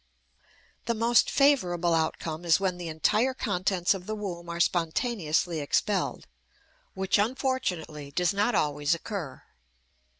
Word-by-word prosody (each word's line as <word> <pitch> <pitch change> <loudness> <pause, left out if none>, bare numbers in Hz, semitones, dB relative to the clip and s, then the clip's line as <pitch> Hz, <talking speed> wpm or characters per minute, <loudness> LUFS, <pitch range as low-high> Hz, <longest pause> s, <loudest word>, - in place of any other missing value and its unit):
The 235 - 0
most 230 +2 +3
favorable 180 -12 +2
outcome 160 0 -1
is 170 0 +4
when 190 -2 -1
the 175 - -5
entire 215 - +1
contents 185 -6 0
of 190 -1 -8
the 215 - -2
womb 175 -5 -6
are 170 0 -4
spontaneously 170 -1 0
expelled, 145 - -1 0.7
which 190 +1 +1
unfortunately 205 - -2
does 180 +6 0
not 205 +5 +1
always 145 +1 +1
occur. 165 -6 -6
180 Hz, 125 wpm, -27 LUFS, 165-215 Hz, 0.7 s, is